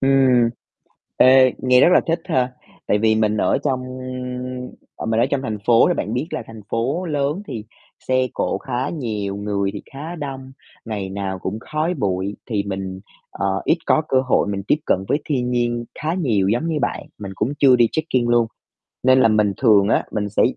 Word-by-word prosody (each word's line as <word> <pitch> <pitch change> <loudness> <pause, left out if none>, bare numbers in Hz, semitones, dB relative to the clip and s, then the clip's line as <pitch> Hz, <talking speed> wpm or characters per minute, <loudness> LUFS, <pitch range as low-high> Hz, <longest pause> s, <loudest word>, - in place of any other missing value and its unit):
Ừm, 130 -3 +4 0.7
ê, 130 0 +6
nghe 125 0 +4
rất - - +6
là - - +6
thích 165 +1 0
ha, 130 -8 0 0.3
tại 105 - +2
vì 110 0 +3
mình 110 -1 +1
ở - - +2
trong 130 -3 0 1.2
à, - - -5
mình 115 0 +1
ở 120 - +4
trong 135 0 -1
thành 110 -5 -3
phố 120 +5 +5
thì 175 - +2
bạn 110 - -3
biết 125 +5 -1
là - - -3
thành 115 -1 -11
phố 135 +11 -1
lớn 150 +3 -1
thì 115 -5 -5 0.4
xe 130 0 +2
cộ - - -1
khá 130 -2 -3
nhiều, 105 -10 -3
người 100 -1 -1
thì - - -7
khá 150 +5 -6
đông, 135 -4 -7 0.3
ngày 105 -4 -4
nào 95 -1 -4
cũng 95 +3 -4
khói 155 +7 -2
bụi 100 - -2
thì 105 -4 -1
mình, 95 -1 -5 0.3
ờ, 100 - -3 0.2
ít 165 - +2
có 155 - +3
cơ 130 - +3
hội 130 -5 +1
mình 100 -1 -3
tiếp - - +4
cận 95 - +1
với 145 - +2
thiên 125 -4 -1
nhiên 120 -1 0 0.2
khá 160 +2 0
nhiều 115 - +1
giống 120 +10 0
như 160 -2 0
bạn. - - -1 0.2
Mình 100 -2 -7
cũng 115 +9 -1
chưa 130 -3 +6
đi 120 -2 +4
trekking 130 -7 0
luôn, 120 -1 +3 0.6
nên 130 +1 +5
là - - +5
mình 105 -2 +2
thường 105 -5 +4
á - - +2
mình 105 -1 -2
sẽ 100 - +1
120 Hz, 205 wpm, -21 LUFS, 105-135 Hz, 1.2 s, ê